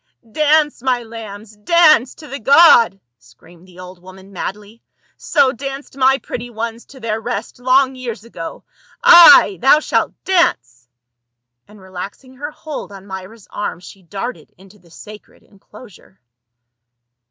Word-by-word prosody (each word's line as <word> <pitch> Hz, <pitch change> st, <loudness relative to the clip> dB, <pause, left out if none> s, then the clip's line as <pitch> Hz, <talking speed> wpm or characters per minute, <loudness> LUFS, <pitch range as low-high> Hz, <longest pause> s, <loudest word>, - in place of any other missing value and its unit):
" 230 Hz, -, -27 dB
Dance, 300 Hz, -2 st, +2 dB
my 250 Hz, -2 st, -1 dB
lambs, 220 Hz, -2 st, -11 dB
dance 305 Hz, +1 st, +3 dB
to 305 Hz, -, -14 dB
the 275 Hz, 0 st, -7 dB
god 235 Hz, -6 st, +5 dB
!" 120 Hz, -, -61 dB
screamed 165 Hz, +10 st, -21 dB
the 180 Hz, -1 st, -19 dB
old 180 Hz, -1 st, -12 dB
woman 190 Hz, +2 st, -15 dB
madly, 210 Hz, +4 st, -8 dB, 0.2 s
" -, -, -41 dB
So 280 Hz, -4 st, +1 dB
danced 275 Hz, +2 st, -8 dB
my 265 Hz, 0 st, +3 dB
pretty 245 Hz, -2 st, -8 dB
ones 230 Hz, 0 st, -6 dB
to 270 Hz, -, -15 dB
their 225 Hz, -2 st, -4 dB
rest 230 Hz, 0 st, -6 dB
long 260 Hz, +1 st, +2 dB
years 245 Hz, -4 st, -7 dB
ago. 195 Hz, -8 st, -9 dB, 0.4 s
Ay! 340 Hz, -, +8 dB
thou 275 Hz, +3 st, +5 dB
shalt -, -, -1 dB
dance 125 Hz, -, -1 dB, 0.4 s
!" 120 Hz, 0 st, -60 dB
And 210 Hz, 0 st, -18 dB
relaxing 190 Hz, +7 st, -10 dB
her 290 Hz, +2 st, -6 dB
hold 305 Hz, -6 st, -9 dB
on 195 Hz, -1 st, -13 dB
Myra's 190 Hz, +2 st, -10 dB
arm 205 Hz, -5 st, -5 dB
she 190 Hz, +2 st, -15 dB
darted 200 Hz, +8 st, -8 dB
into 195 Hz, +2 st, -19 dB
the 170 Hz, -1 st, -24 dB
sacred 210 Hz, +5 st, -15 dB
enclosure. 205 Hz, -1 st, -18 dB
225 Hz, 155 wpm, -17 LUFS, 190-265 Hz, 0.4 s, Ay